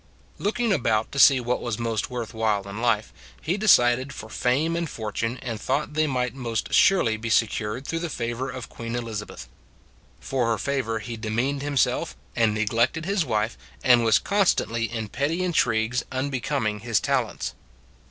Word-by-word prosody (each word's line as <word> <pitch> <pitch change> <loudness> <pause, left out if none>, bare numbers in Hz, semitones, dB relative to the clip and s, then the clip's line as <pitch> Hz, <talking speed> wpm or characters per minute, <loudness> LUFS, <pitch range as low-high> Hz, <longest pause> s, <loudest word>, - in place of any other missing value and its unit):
Looking 225 +1 +1
about 110 - +1
to 140 - -3
see 135 -1 +8
what 125 0 -1
was 120 -3 -3
most 115 -2 -2
worth 120 -3 -5
while 105 -3 0
in 100 +3 -6
life, 115 -3 +1 0.3
he 170 - -1
decided 130 - +4
for 110 - -8
fame 145 +9 +1
and 170 -2 -2
fortune 115 +2 -3
and 115 -4 -4
thought 145 +3 -1
they 155 0 +2
might 125 -3 -1
most 120 -4 -3
surely 120 - +4
be 115 +1 -5
secured 110 +3 0
through 165 - -2
the 170 0 -3
favor 120 0 -3
of 130 -3 -6
Queen 115 0 -6
Elizabeth. 110 - -5 0.7
For 130 -3 -1
her 115 -1 +1
favor 125 -1 -1
he 115 +2 -6
de 110 0 -5
meaned 135 +6 0
himself, 145 -2 0 0.2
and 115 -2 +3
neglected 115 +9 0
his 195 -1 +1
wife, 110 - -1 0.3
and 120 -2 +5
was 115 -1 +5
constantly 175 - +1
in 110 -2 -3
petty 145 - -1
intrigues 125 -8 +1
un 130 +2 -2
becoming 125 -5 -1
his 115 0 +1
talents. - - -1
120 Hz, 170 wpm, -25 LUFS, 110-140 Hz, 0.7 s, see